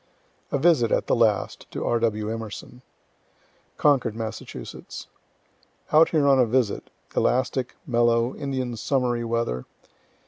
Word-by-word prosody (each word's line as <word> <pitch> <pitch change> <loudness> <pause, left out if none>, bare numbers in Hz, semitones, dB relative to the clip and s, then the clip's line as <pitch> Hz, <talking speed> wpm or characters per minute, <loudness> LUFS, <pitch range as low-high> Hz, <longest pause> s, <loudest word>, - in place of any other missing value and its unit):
A - - +1
VISIT, 135 -6 +3
AT - - +2
THE - - +2
LAST, 110 -3 +1
TO - - -4
R. 120 - +1
W. 110 -2 0
EMERSON 115 +2 -8 1.0
Concord, 135 -7 +2
Mass. 110 -1 -4 1.5
Out 155 +2 +6
here 155 -3 +2
on 135 -1 +5
a 125 - +5
visit 120 -2 0 0.3
elastic, 130 0 0
mellow, 120 -2 +2
Indian 130 -4 -3
summery 120 0 0
weather. 115 - -2
120 Hz, 125 wpm, -25 LUFS, 115-130 Hz, 1.5 s, Out